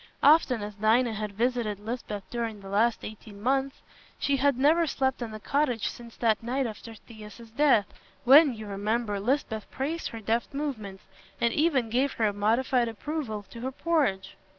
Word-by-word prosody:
Often 275 -7 +5
as 210 0 -6
Dinah 220 +3 +2
had 210 -1 -4
visited 230 -2 -1
Lisbeth 210 -2 -5
during 230 -3 -3
the 195 -1 -10
last 220 +4 +1
eighteen 210 -1 -10
months, 270 +4 -1 0.3
she 280 -1 +1
had 280 -1 +2
never 315 +5 +4
slept 265 -2 -1
in 235 - -3
the 215 0 -8
cottage 255 -2 0
since 235 -1 -11
that 225 -3 +2
night 255 +4 -1
after 225 0 -7
Thias's 220 +1 -13
death, 260 -5 +4 0.4
when, 275 +1 +7
you 215 -1 -8
remember, 205 +1 -2
Lisbeth 220 -2 -1
praised 315 +5 -3
her 225 - -7
deft 225 +5 -1
movements 220 -10 -4 0.4
and 235 -1 +2
even 280 -8 +1
gave 260 +3 0
a 215 -2 +2
modified 235 +4 +1
approval 230 -2 -4
to 230 - -9
her 260 +2 -3
porridge. 265 - 0
235 Hz, 170 wpm, -27 LUFS, 215-270 Hz, 0.4 s, when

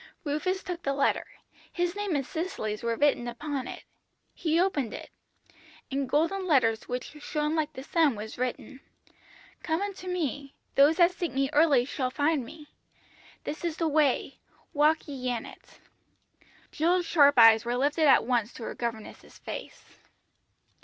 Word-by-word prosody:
"Rufus 345 +6 -2
took 355 -1 -5
the 275 -3 -1
letter. 280 - +1 0.4
His 350 +1 -1
name 410 -5 -2
and 275 -2 -1
Cicely's 315 - -4
were 235 0 -1
written 280 -3 +2
upon 265 +2 -4
it. - - -8 0.5
He 325 0 0
opened 300 - 0
it. - - -10 0.8
In 275 0 -1
golden 335 +7 0
letters 230 -8 +2
which 250 +4 -5
shone 300 +1 -1
like 310 -1 -1
the 260 - -8
sun 305 -3 +2
was 215 +2 -7
written 255 +1 -4 0.8
"'Come 320 0 -1
unto 395 -2 -5
Me. 285 -6 -3 0.2
Those 285 +3 +5
that 350 0 +5
seek 350 -2 -4
Me 270 +1 0
early 290 -5 +4
shall 260 -1 -2
find 290 +1 0
Me. 295 +5 -12 0.7
This 305 - -6
is 335 -2 -2
the 330 - 0
way, 295 -3 +1 0.3
walk 305 +3 +2
ye 260 -3 -4
in 240 -2 -3
it.'" - - -15 0.9
Jill 350 +3 +2
sharp 285 -5 +4
eyes 225 -2 +8
were 240 +1 -1
lifted 295 +4 +2
at 270 - +5
once 240 -2 0
to 235 - -9
her - - -5
governess's 230 -3 -6
face. - - -8
290 Hz, 160 wpm, -28 LUFS, 255-330 Hz, 0.9 s, eyes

